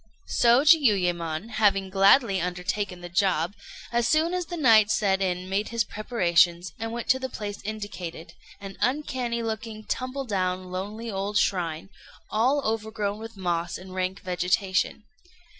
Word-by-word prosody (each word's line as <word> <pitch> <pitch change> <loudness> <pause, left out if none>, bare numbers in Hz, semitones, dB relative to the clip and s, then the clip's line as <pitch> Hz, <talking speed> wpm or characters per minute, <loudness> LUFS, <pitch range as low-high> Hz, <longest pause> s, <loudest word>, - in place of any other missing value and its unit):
So 240 +3 +5
Jiuyémon 195 - +3
having 195 -3 +2
gladly 195 +1 +4
undertaken 180 +1 -3
the 175 - -7
job, 175 -1 +1 0.4
as 235 0 +1
soon 320 +3 +2
as 360 -2 -2
the 350 - -5
night 225 -8 +5
set 195 -3 +1
in 180 -1 -1
made 195 +3 -1
his 230 -1 +1
preparations, 175 -6 +1
and 225 +1 -3
went 235 0 -5
to 260 - +4
the 260 0 -4
place 205 -3 -6
indicated 190 -6 -6 0.3
an 195 -1 -9
uncanny 250 -3 -1
looking, 220 -1 -5
tumble 255 +4 -3
down, 185 -4 -2
lonely 210 +5 -5
old 200 +1 -2
shrine, 175 -2 -1 0.4
all 260 +7 +2
overgrown 215 -2 -2
with 225 -1 -9
moss 175 -2 -2
and 185 0 -11
rank 185 +1 -2
vegetation. 185 +3 0
205 Hz, 145 wpm, -26 LUFS, 185-230 Hz, 0.4 s, So